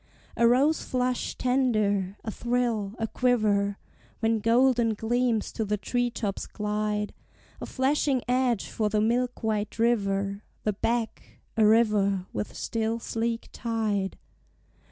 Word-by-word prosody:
A 235 - +4
rose 275 +6 +3
flush 250 -1 -1
tender, 215 -7 +1
a 220 - -3
thrill, 235 -4 -1
a 225 - -1
quiver, 215 -5 +1 0.4
When 225 0 +1
golden 235 0 +3
gleams 235 0 0
to 220 - -2
the 210 0 -1
tree 245 +4 0
tops 210 -4 -4
glide; 210 0 -2 0.5
A - - -5
flashing 270 -1 +1
edge 250 -3 +1
for 215 -2 -1
the 210 0 +1
milk 245 +3 0
white 215 -1 -1
river, 200 -3 +1 0.2
The 210 - +1
beck, 230 +3 -3
a 220 -2 +5
river 210 -4 +3
with 210 - -4
still 225 0 -1
sleek 230 0 -3
tide. 215 -5 -2
225 Hz, 130 wpm, -27 LUFS, 210-245 Hz, 0.5 s, a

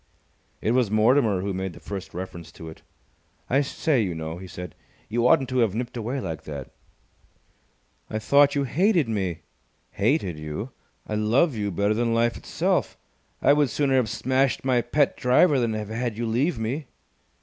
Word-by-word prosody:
It 110 - +1
was 125 -3 +2
Mortimer 110 -2 +3
who 100 +1 -2
made 95 -1 -3
the - - -12
first 100 -2 -7
reference 90 -2 -7
to 80 - -10
it. 80 - -13 0.7
"I 135 +2 +4
say, 140 -1 0
you 90 -5 -2
know," 80 +1 -5
he 95 - -9
said, 90 -2 -8 0.4
"you 120 +2 +2
oughtn't 135 -2 +4
to 130 0 0
have 110 -4 +2
nipped 120 +2 -4
away 120 +4 -3
like 80 -8 -5
that!" 70 -3 -7 1.4
"I 110 - -2
thought 140 +6 +4
you 140 - +1
hated 170 - +2
me!" 95 -7 -2 0.5
"Hated 100 - 0
you! 75 +11 -5 0.3
I - - -5
love 115 +9 +2
you 105 -2 -2
better 100 +3 +1
than 115 +1 0
life 115 0 +2
itself! - - -1 0.5
I 140 - +6
would 145 -2 +3
sooner 140 +2 +1
have 120 -4 +1
smashed 130 +4 0
my 125 -2 +3
pet 145 +3 +1
driver 135 +4 +4
than 115 -2 0
have 105 -1 -4
had 115 0 -3
you 120 - -2
leave 125 +9 0
me!" 125 +6 -3
115 Hz, 180 wpm, -25 LUFS, 100-135 Hz, 1.4 s, I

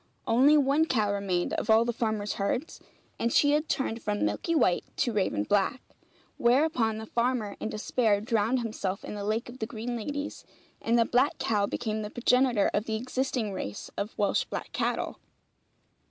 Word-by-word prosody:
Only 270 +7 +5
one 285 +2 +3
cow 215 -8 +1
remained 190 -3 -1
of - - -2
all 220 +1 +6
the 240 - -1
farmer's 220 -3 -1
herds, 240 +10 -2 0.4
and 235 - 0
she 285 +4 +4
had 300 +1 +1
turned 235 -4 -1
from 205 -1 -1
milky 335 - -1
white 185 - +3
to 240 - +1
raven 190 - 0
black. 205 - +1 0.6
Whereupon 240 -3 +2
the 220 - -6
farmer 235 -3 -1
in - - -3
despair 215 -1 +1
drowned 230 +2 +1
himself 200 -4 -3
in - - -6
the 205 -1 -5
lake 215 +3 -1
of 245 +2 -10
the 220 - -2
green 240 +1 -4
ladies, 285 +6 -4 0.4
and 230 +1 +2
the 230 - +4
black 255 +5 +2
cow 205 -2 +1
became 215 0 -2
the 210 - -5
progenitor 245 -2 +2
of 210 - 0
the 220 - -2
existing 250 -2 -2
race 100 - -6
of 205 +2 -4
Welsh 205 -1 +1
black - - -6
cattle. - - -2
225 Hz, 180 wpm, -28 LUFS, 210-255 Hz, 0.6 s, all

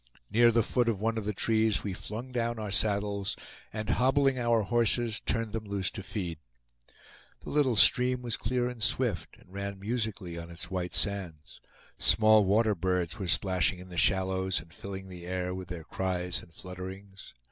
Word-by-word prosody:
Near 120 +2 +6
the 115 0 +3
foot 120 +1 +1
of 105 -4 -1
one 115 +2 0
of 105 - -6
the 105 - 0
trees 110 -3 +2
we 100 - -3
flung 115 +7 -6
down 120 -1 -1
our 105 -2 -4
saddles, 100 -1 0 0.3
and 110 -1 -4
hobbling 135 +2 +3
our 120 -2 +2
horses 120 0 +1
turned 115 -2 -2
them 110 -1 -3
loose 100 -2 -2
to 100 - -6
feed. 90 -5 -4 1.0
The - - -8
little 140 -5 +2
stream 125 +4 +5
was 120 -2 -1
clear 125 +2 -1
and 125 -2 -7
swift, 110 - 0
and 90 - -20
ran 100 0 -5
musically 105 -5 -3
on 85 0 -8
its 85 +1 -8
white 90 -1 -3
sands. 85 -10 -2 0.4
Small 110 -1 +6
water 105 +3 +3
birds 90 -2 -1
were 95 - -3
splashing 90 +2 +2
in 90 +1 -11
the 90 - -9
shallows, 95 0 +2
and 85 - -14
filling 95 +3 -7
the 90 -2 -9
air 90 0 -2
with 95 -1 -6
their 85 -2 -6
cries 90 0 -2
and 85 - -16
flutterings. 95 +1 -9
100 Hz, 180 wpm, -29 LUFS, 90-115 Hz, 1.0 s, Near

